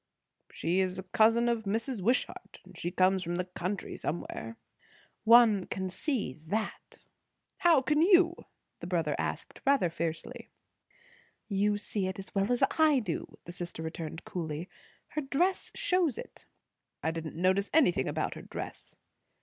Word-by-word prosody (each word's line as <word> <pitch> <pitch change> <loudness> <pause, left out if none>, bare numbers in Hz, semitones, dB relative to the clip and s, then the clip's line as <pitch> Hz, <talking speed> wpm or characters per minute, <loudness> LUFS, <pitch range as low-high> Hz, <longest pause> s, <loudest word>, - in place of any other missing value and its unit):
"She 175 +4 0
is 185 -1 +1
a 190 - -4
cousin 225 +5 +3
of 230 -2 0
Mrs. 225 +3 -1
Wishart; 240 +7 -1
and - - -15
she 175 - -3
comes 185 +1 +3
from 175 0 -3
the 180 +1 -1
country 180 +2 -4
somewhere." 115 -8 -4 0.7
"One 225 -4 +6
can 190 -1 -3
see 240 - -2
that." 160 +10 -5 0.5
"How 340 -7 +5
can 300 +3 +2
you?" 350 -1 +5 0.4
the - - -7
brother 165 -4 0
asked - - -4
rather 270 - +3
fiercely. 165 -1 -4 1.0
"You 205 0 +1
see 205 -2 -2
it 190 - -4
as 195 - -8
well 200 +3 +1
as 245 - +2 0.2
I 310 -3 +6
do," 205 -10 -3
the 175 - -7
sister 175 -2 -6
returned 160 +1 -6
coolly. 165 -1 -4 0.4
"Her 305 - -2
dress 335 +7 0
shows 355 -8 +1
it." - - -9 0.6
"I 160 - +1
didn't 165 -1 -6
notice 185 +4 +2
anything 180 - +3
about - - -1
her - - -9
dress." - - -8
195 Hz, 150 wpm, -30 LUFS, 175-245 Hz, 1.0 s, One